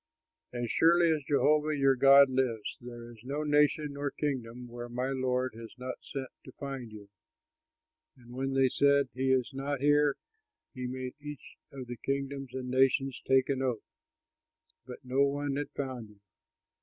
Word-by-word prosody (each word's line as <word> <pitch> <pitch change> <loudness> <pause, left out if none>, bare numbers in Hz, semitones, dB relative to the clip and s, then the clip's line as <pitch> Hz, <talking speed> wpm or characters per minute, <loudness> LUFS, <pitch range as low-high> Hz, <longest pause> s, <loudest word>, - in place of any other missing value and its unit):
As 120 -2 -3
surely 170 0 +4
as 155 -2 0
Jehovah 150 +1 +2
your 135 -1 +4
God 140 +2 +7
lives, 130 -4 -1
there 120 -1 -9
is 115 - -15
no 140 +4 -3
nation 150 0 +2
nor 140 0 -2
kingdom 125 -5 -4
where 120 0 -8
my 125 +2 -2
lord 130 -2 -1
has 115 0 -11
not 125 0 -6
sent 135 -2 -6
to 130 - -11
find 135 -5 -6
you; 105 -1 -11 1.1
and 120 -1 -15
when 135 +1 -2
they 135 -1 +5
said, 140 +1 +3
'He 130 +1 0
is 130 0 +1
not 140 +1 -3
here,' 145 0 +3 0.6
he 125 -3 -4
made 130 0 -5
each 150 -1 -9 0.2
of 135 -2 -7
the 120 0 -7
kingdoms 135 0 -3
and 125 -1 -4
nations 135 0 +2
take 130 -1 +4
an 135 -2 -1
oath, 125 -5 -2 1.0
that 125 +1 -10
no 130 +2 +1
one 140 0 +1
had 145 +1 -3
found 130 -5 -5
you. 105 -1 -20
130 Hz, 170 wpm, -30 LUFS, 125-140 Hz, 1.1 s, God